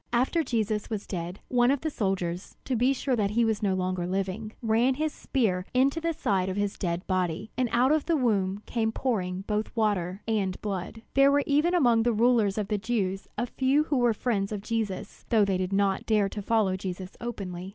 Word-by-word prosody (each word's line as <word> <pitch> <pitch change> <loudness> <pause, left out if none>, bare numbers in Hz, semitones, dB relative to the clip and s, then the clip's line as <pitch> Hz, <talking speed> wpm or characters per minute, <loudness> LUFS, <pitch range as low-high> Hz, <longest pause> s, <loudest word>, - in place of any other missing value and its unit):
After 255 +8 +2
Jesus 215 -5 -1
was 215 -3 -3
dead, 175 +1 -5
one 245 -1 +3
of 275 -1 +1
the 315 - -2
soldiers, 185 -5 -2
to 260 - -1
be 250 +3 +3
sure 265 -1 0
that 205 -4 +1
he 230 +3 +2
was 220 -2 0
no 195 -3 +1
longer 185 -1 -1
living, 195 +3 -2
ran 230 +4 +3
his 310 +2 -1
spear 205 -9 0
into 275 +5 +3
the 335 0 0
side 195 - 0
of 190 - -3
his 205 -1 -1
dead 175 -1 -3
body; 185 +1 -1
and 255 -2 0
out 250 +3 +3
of 310 -1 +1
the 335 - +3
wound 205 -5 0
came 225 -2 0
pouring 190 -8 -1
both 210 0 -1
water 205 -4 0
and 200 -4 0
blood. 200 +2 -5
There 275 +1 +5
were 285 0 +3
even 300 +5 +2
among 240 -9 +4
the 240 +1 +2
rulers 220 -3 +3
of 210 -2 -1
the 210 - 0
Jews 195 -3 -2
a 240 - 0
few 265 +4 +2
who 300 -3 -1
were 240 -3 +3
friends 205 -4 -1
of 210 -2 -3
Jesus, 210 -4 -3
though 220 -4 +4
they 195 -2 0
did 185 0 -2
not 195 -1 +1
dare 210 -3 +3
to 205 - -5
follow 205 -3 +2
Jesus 185 0 -6
openly. 190 -6 -5
215 Hz, 215 wpm, -27 LUFS, 190-245 Hz, -, There